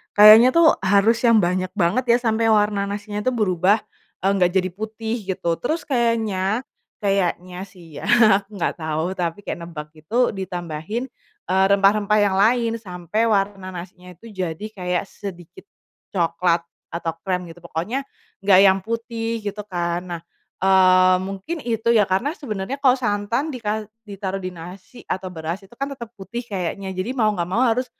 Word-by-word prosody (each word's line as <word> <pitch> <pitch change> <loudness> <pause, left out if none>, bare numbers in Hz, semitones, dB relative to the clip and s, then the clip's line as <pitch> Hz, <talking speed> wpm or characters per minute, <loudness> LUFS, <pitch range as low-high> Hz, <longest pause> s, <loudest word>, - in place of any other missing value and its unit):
kayaknya 215 +4 +9
tuh 335 -1 +6
harus 200 +4 +3
yang 230 -2 +6
banyak 185 +1 0
banget 205 +6 +1
ya - - +4
sampai 225 -1 +1
warna 210 -1 +2
nasinya 205 +1 -4
itu 255 +4 0
berubah, 195 0 +2 0.4
eee, 195 - +3
gak 180 -1 +3
jadi 185 -1 +2
putih 220 +3 -4
gitu 170 -3 -1
terus 320 +7 -1
kayaknya 230 -4 0 0.4
kayaknya 185 -2 0
sih 170 -5 -14
ya - - -7 0.3
aku 200 0 -20
gak - - +1
tau 155 0 -1
tapi 170 +1 -2
kayak - - -4
nebak 150 -3 -8
gitu 160 +11 0
ditambahin, 175 +4 -4 0.5
eee, 190 +1 +4
rempah-rempah 205 +1 +3
yang 195 -2 +1
lain 230 +2 +3
sampai 185 +2 -2
warna 195 -2 0
nasinya 180 +1 -10
itu 230 +7 -13
jadi 185 -1 -4
kayak 180 -3 -2
sedikit, 185 - -10 0.5
coklat 170 -1 +1 0.3
atau 170 -1 -2
krem 180 -1 -1
gitu 175 - -14
pokoknya, 175 - -4 0.4
gak 190 -2 +7
yang 195 -1 +5
putih 230 +1 -4
gitu 205 0 -5
kan 175 -2 -2
nah, 170 -2 -5 0.4
eee, 185 -1 +5
mungkin 195 - -5
itu 230 -1 -1
ya 210 -4 +4
karena 215 +10 +1
sebenernya 220 - -5
kalo 260 -2 +5
santan 230 +6 -1
dika 220 -3 -2 0.2
ditaruh 195 -1 -4
di 185 - -3
nasi 185 +8 -11
atau 185 0 -3
beras 170 +2 -5
itu 195 +4 -18
kan 275 +1 -3
tetap 235 -4 -9
putih 200 +5 -6
kayaknya 190 0 -4
jadi 190 +7 -2
mau 225 -5 +2
gak 170 0 -2
mau 230 +7 +1
harus, 250 +1 +2
195 Hz, 165 wpm, -22 LUFS, 180-225 Hz, 0.5 s, kayaknya